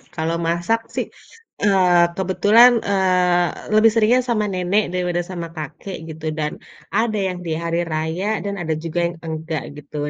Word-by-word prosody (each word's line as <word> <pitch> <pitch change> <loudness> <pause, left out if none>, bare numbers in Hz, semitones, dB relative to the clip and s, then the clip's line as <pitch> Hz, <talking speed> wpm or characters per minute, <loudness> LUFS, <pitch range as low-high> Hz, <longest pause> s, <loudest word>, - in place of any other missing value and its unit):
Kalau 165 0 -1
masak 175 +7 +1 0.2
sih, - - 0 0.6
eee, 180 -4 +4
kebetulan, 205 +6 +5 0.2
eee, 180 -2 +1
lebih 220 +1 +6
seringnya 230 +3 +4
sama 215 -3 +1
nenek 185 +3 +1
daripada 180 -1 0
sama 170 -2 -5
kakek 160 +5 -7
gitu, 160 0 -8
dan 150 0 -1 0.5
ada 220 -1 0
yang 180 -1 -4
di 165 - -3
hari 170 0 -1
raya 160 +4 -2 0.2
dan 200 0 -2
ada 160 -2 -1
juga 165 +1 -2
yang 170 0 -7
enggak 160 -1 -4 0.2
gitu, 150 0 -13
180 Hz, 155 wpm, -21 LUFS, 165-200 Hz, 0.6 s, lebih